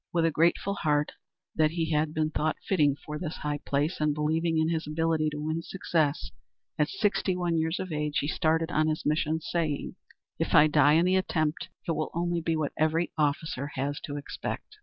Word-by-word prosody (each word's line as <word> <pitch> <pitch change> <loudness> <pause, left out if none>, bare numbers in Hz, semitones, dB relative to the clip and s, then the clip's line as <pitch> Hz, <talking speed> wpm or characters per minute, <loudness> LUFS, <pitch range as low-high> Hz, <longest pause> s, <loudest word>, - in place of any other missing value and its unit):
With 165 -1 +2
a 165 - +3
grateful 170 +5 +2
heart 150 -5 +1 0.4
that 155 -1 +3
he 165 0 -2
had 150 0 +1
been 155 0 0
thought 155 +1 0
fitting 150 -7 +3
for 150 0 -5
this 165 -3 -4
high 145 0 -3
place, 145 +5 -1
and 150 -1 +2
believing 160 +2 0
in 160 0 +2
his 160 -2 -2
ability 160 0 +1
to 150 0 -6
win 155 +2 -2
success, 160 -5 -1 0.5
at 150 +1 +2
sixty 205 -3 0
one 175 -2 0
years 160 +2 0
of 185 -2 -4
age 150 -1 -1
he 145 - 0
started 160 +2 +1
on 155 -2 +2
his 155 0 -2
mission, 155 +1 +1
saying, 155 -4 -2 0.5
"If - - 0
I 150 - +8
die 150 -1 +5
in 165 +3 +4
the 185 +1 +3
attempt, 155 -4 -1 0.2
it - - +1
will 155 -1 -1
only 175 0 0
be 165 0 0
what 155 -2 -2
every 160 +2 +1
officer 145 -2 -1
has 140 +2 -2
to 145 -3 -5
expect. 285 - -6
155 Hz, 200 wpm, -28 LUFS, 150-165 Hz, 0.5 s, I